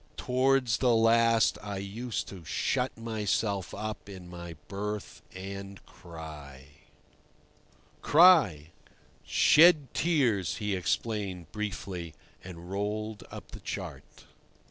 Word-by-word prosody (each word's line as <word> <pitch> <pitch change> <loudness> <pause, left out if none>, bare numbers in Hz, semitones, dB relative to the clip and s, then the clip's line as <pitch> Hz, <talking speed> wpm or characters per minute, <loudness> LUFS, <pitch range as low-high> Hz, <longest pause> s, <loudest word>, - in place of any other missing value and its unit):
Towards 130 -2 +2
the 125 -2 +3
last 115 0 +4
I 100 -2 -5
used 110 +5 -4
to 95 -4 -10
shut 125 - -1
myself 105 -3 -1
up 105 0 -6
in 95 -3 -10
my 85 -1 -8
berth 105 +1 -5
and 100 +1 -7
cry." 75 -6 -11 1.3
"Cry?" 145 - +5 0.5
"Shed 155 -5 +5
tears," 120 - +1
he 105 -2 -2
explained 95 -3 -2
briefly, 90 -5 -5 0.3
and 90 0 -10
rolled 105 +2 -3
up - - -10
the - - -9
chart. - - -8
105 Hz, 100 wpm, -29 LUFS, 90-115 Hz, 1.3 s, Cry